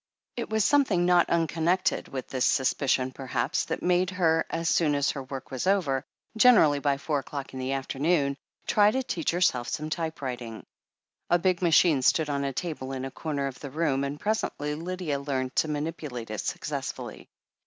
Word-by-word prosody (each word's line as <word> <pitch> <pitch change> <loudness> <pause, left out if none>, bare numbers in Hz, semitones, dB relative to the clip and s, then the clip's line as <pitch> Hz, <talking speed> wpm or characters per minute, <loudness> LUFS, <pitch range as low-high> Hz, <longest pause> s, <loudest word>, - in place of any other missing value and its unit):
It 240 - -4
was 220 -2 +1
something 275 -12 +3
not 175 -1 +4
unconnected 170 +2 +1
with 130 -2 -6
this 130 -2 -2
sus 130 -2 +3
picion, 130 -2 0
perhaps, 130 -3 -1
that - - -4
made 180 0 +2
her, 165 -4 +1
as 165 0 -2
soon 155 -3 +3
as 140 0 +2
her 140 - -5
work 135 0 -8
was 130 +7 -3
over, 160 -10 +2 0.3
generally 215 -11 +6
by 140 -1 +1
four 145 +1 -1
o'clock 140 0 -7
in 130 - -6
the 130 +1 -2
afternoon, 140 +2 0 0.3
try 205 -1 +4
to 260 +5 -1
teach 175 -9 -2
herself 165 -9 +1 0.2
typewriting. 130 -9 -4 0.6
A 175 - +5
big 180 0 +1
machine 165 -4 +4
stood 150 +3 +2
on 140 0 -1
a 140 - -1
table 135 -3 -4
in 130 0 -4
a 135 - -6
comer 145 -2 -3
of 130 -2 -5
the 140 - -7
room, 140 -2 0
and 140 +1 -4
presently 205 -8 -1
Lydia 165 -2 -3
learnt 130 -2 -3
to - - +3
manipulate 145 -6 -4
it 110 - -3
suc - - -4
cessfully. - - -5
150 Hz, 185 wpm, -27 LUFS, 135-175 Hz, 0.6 s, generally